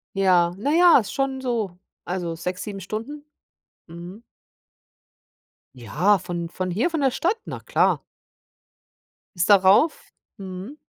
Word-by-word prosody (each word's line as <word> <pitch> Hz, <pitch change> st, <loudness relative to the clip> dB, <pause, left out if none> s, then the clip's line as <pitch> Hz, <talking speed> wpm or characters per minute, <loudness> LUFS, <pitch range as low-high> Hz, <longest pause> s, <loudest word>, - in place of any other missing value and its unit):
Ja, 180 Hz, -3 st, +3 dB
na 275 Hz, +9 st, -1 dB
ja, 345 Hz, +1 st, +7 dB
ist 210 Hz, -, -5 dB
schon 270 Hz, -1 st, -1 dB
so 225 Hz, -8 st, -2 dB, 0.3 s
also 175 Hz, -2 st, -4 dB
6, 180 Hz, +2 st, -5 dB
7 200 Hz, -2 st, -7 dB
Stunden. 230 Hz, +10 st, -6 dB, 0.6 s
Mhm. 175 Hz, +6 st, -11 dB, 1.5 s
Ja, 150 Hz, -, +1 dB
von 170 Hz, -1 st, -5 dB
von 185 Hz, +1 st, -4 dB
hier, 220 Hz, -, 0 dB
von 325 Hz, -3 st, -2 dB
der 270 Hz, -2 st, +3 dB
Stadt, 365 Hz, -, 0 dB
na -, -, -6 dB
klar. -, -, +1 dB, 1.3 s
Bis 175 Hz, 0 st, +1 dB
darauf, 200 Hz, -, +4 dB, 0.3 s
mhm. 190 Hz, +8 st, -8 dB
195 Hz, 125 wpm, -23 LUFS, 180-260 Hz, 1.5 s, ja